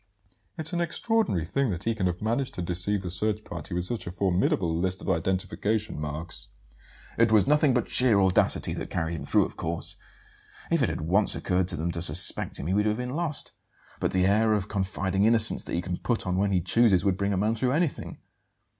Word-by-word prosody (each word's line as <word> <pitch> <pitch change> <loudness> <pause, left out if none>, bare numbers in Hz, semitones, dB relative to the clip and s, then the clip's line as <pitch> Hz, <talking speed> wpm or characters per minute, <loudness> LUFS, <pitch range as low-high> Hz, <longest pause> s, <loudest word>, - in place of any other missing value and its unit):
"It's 160 +2 -3
an 175 - -1
extraordinary 170 - -1
thing 135 +8 -1
that 90 -2 -4
he 115 - 0
can 100 -4 -2
have 90 +2 -4
managed 120 +4 -2
to 90 - -4
deceive 90 +3 0
the 90 - -4
search 105 +4 0
party 85 0 -7
with 90 0 -2
such 115 +1 -4
a - - -4
formidable 90 -2 0
list 90 +2 -1
of - - -5
identification 95 +2 -2
marks." 75 -3 -3 0.7
"It 115 -1 +3
was 110 -3 +4
nothing 150 -2 +2
but 125 - 0
sheer 120 -5 +3
audacity 95 -2 +2
that - - -6
carried 80 -1 -3
him 75 - -7
through, - - +2
of - - -10
course. 85 +1 -5 0.7
If 165 -3 +2
it 125 - +1
had - - -4
once 95 +7 +4
occurred 90 -1 -1
to 90 - 0
them 85 +2 -3
to 85 -1 -3
suspect 85 - +5
him - - -6
he 90 - -1
would 105 +2 +1
have 105 0 0
been 125 +2 -5
lost. 160 -3 -2 0.5
But - - 0
the 95 0 +1
air 110 +3 +2
of 105 -2 -1
confiding 95 0 -1
innocence 115 -1 +5
that - - -4
he 85 - -2
can 90 -1 -4
put 120 -2 -2
on 90 0 -2
when 100 +1 0
he 90 -2 +1
chooses 105 -1 +3
would 95 -2 +2
bring 100 +1 -2
a 100 - -1
man 105 +4 0
through 125 +3 -1
anything. 160 -1 -2
100 Hz, 220 wpm, -26 LUFS, 90-115 Hz, 0.7 s, suspect